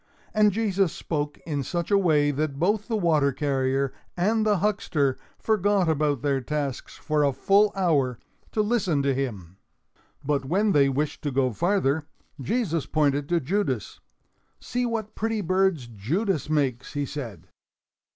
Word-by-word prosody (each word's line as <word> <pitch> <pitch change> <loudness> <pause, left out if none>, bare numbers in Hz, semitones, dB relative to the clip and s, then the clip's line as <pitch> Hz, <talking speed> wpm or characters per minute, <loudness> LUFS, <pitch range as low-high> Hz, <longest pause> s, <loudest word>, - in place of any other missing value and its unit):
And 210 -1 +4
Jesus 200 -4 +1
spoke 150 -2 -3
in 145 -4 -2
such 170 +7 -3
a 200 - +6
way 150 -6 +3
that 145 0 -2
both 200 +6 +1
the 225 - 0
water 155 -7 +2
carrier 135 -1 0 0.2
and 215 +5 +2
the 210 -2 +3
huckster 165 -9 0 0.2
forgot 205 -3 +1
about 150 -4 +1
their 140 -2 +1
tasks 140 0 -4
for 150 -1 0
a 140 - +3
full 200 +9 +3
hour, 145 -10 +1 0.3
to 215 - +1
listen 190 -10 +1
to 140 -1 +2
him. 100 -10 -4 0.7
But 140 -1 0
when 195 +10 +1
they 140 -5 +4
wished 145 +3 -2
to 145 - -2
go 130 -1 +1
farther, 160 - +1 0.3
Jesus 170 - -1
pointed 145 -2 +1
to 175 -1 +2
Judas. 140 - -2 0.6
"See 245 0 -2
what 220 -2 -3
pretty 225 -1 -1
birds 185 -5 +1
Judas 150 - -2
makes!" 135 -5 -1
he 145 -1 -1
said. 115 - -7
155 Hz, 150 wpm, -25 LUFS, 140-200 Hz, 0.7 s, a